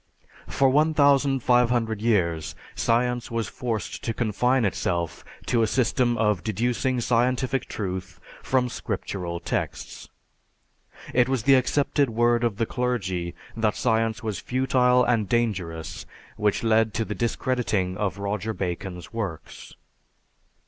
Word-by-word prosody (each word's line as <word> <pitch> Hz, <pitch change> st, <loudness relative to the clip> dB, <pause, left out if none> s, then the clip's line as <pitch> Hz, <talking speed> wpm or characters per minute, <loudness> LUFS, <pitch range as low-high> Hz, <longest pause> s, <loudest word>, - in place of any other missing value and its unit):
For 135 Hz, -, +2 dB
1500 130 Hz, -6 st, +3 dB
years 85 Hz, -9 st, 0 dB, 0.2 s
science 120 Hz, +1 st, 0 dB
was 115 Hz, -1 st, -2 dB
forced 115 Hz, -5 st, -4 dB
to 115 Hz, -, -2 dB
confine 125 Hz, +2 st, +1 dB
itself 85 Hz, -4 st, -2 dB, 0.2 s
to 120 Hz, -, +2 dB
a 110 Hz, -, +3 dB
system 120 Hz, 0 st, +1 dB
of 105 Hz, -5 st, +1 dB
deducing 120 Hz, +5 st, 0 dB
scientific 125 Hz, +2 st, +1 dB
truth 95 Hz, -3 st, -5 dB, 0.2 s
from 130 Hz, -1 st, +1 dB
scriptural 90 Hz, -7 st, -4 dB
texts. -, -, -4 dB, 1.0 s
It 125 Hz, +1 st, +3 dB
was 130 Hz, -5 st, 0 dB
the 135 Hz, -, +5 dB
accepted 140 Hz, +1 st, +2 dB
word 120 Hz, +1 st, +2 dB
of 115 Hz, -4 st, 0 dB
the 115 Hz, -, +1 dB
clergy 95 Hz, -9 st, -2 dB, 0.2 s
that 110 Hz, -2 st, +1 dB
science 115 Hz, -2 st, 0 dB
was 110 Hz, -3 st, -3 dB
futile 125 Hz, -1 st, +2 dB
and 115 Hz, -5 st, +1 dB
dangerous 90 Hz, -9 st, -2 dB, 0.3 s
which 105 Hz, +1 st, 0 dB
led 110 Hz, -1 st, +2 dB
to 115 Hz, -, 0 dB
the 105 Hz, -, -4 dB
discrediting 115 Hz, -4 st, -1 dB
of 100 Hz, -2 st, -2 dB
Roger 105 Hz, +2 st, -3 dB
Bacon's 90 Hz, 0 st, -5 dB
works. 100 Hz, -9 st, -6 dB
115 Hz, 120 wpm, -25 LUFS, 100-125 Hz, 1.0 s, the